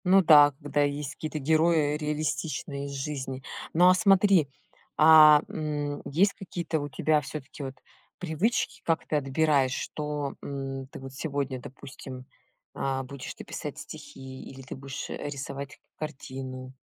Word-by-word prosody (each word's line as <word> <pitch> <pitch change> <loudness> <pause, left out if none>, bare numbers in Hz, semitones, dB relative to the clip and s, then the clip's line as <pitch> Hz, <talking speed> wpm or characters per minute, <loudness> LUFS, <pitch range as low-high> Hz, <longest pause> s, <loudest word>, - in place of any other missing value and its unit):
Ну 190 +1 +6
да, 145 -3 +8
когда 145 0 0
есть 145 0 -1
какие-то 155 0 -5
герои 155 0 +3
реалистичные 150 -1 -2
из - - -6
жизни. 135 -2 -4 0.3
Но 180 +3 +6
а - - +7
смотри, 195 -4 +5 0.5
а, 155 -1 +9
м, 145 -2 -3
есть 190 +8 +3
какие-то 170 -4 -3
у 145 0 -4
тебя 150 +2 +2
всё-таки 140 0 -7
вот 135 -1 -6 0.4
привычки, 180 +7 -1
как 165 -1 0
ты - - -1
отбираешь, 140 -1 +2
что, 150 -2 -3
м, 135 -1 -5
ты - - -10
вот 135 0 -9
сегодня, 140 -2 -3
допустим, 130 0 -10 0.5
а, 135 -1 -1
будешь 130 0 -7
ты - - -9
писать - - -6
стихи 130 0 -9
или 135 0 -10
ты 130 - -8
будешь, 135 +1 -6
э, - - -4
рисовать 140 0 -6 0.2
к - - -45
картину? 130 -3 -6
145 Hz, 150 wpm, -28 LUFS, 135-155 Hz, 0.5 s, а